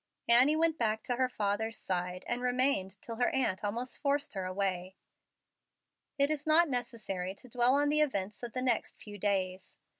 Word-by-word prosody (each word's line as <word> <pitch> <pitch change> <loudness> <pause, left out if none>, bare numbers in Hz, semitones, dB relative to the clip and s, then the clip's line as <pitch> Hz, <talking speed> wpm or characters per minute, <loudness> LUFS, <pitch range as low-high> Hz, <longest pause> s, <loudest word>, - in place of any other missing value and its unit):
Annie 250 +6 +6
went 320 0 +1
back 220 -2 0
to 245 - -2
her 255 0 +1
father's 215 0 -2
side, 180 0 -3
and 240 +1 -1
remained 250 -7 +1
till 230 -1 -6
her 245 - +2
aunt 255 -8 -1
almost 235 +5 -4
forced 285 0 0
her 190 -2 -4
away. 185 -1 -2 1.2
It 280 +1 +3
is 300 0 -2
not 330 +2 +6
necessary 220 -8 -3
to 250 - -13
dwell 245 +2 +3
on 290 +1 +2
the 305 +1 +3
events 210 -8 -1
of 240 -2 -6
the 255 - -1
next 245 -3 0
few 205 -1 -10
days. 190 -2 -2
235 Hz, 180 wpm, -31 LUFS, 195-260 Hz, 1.2 s, Annie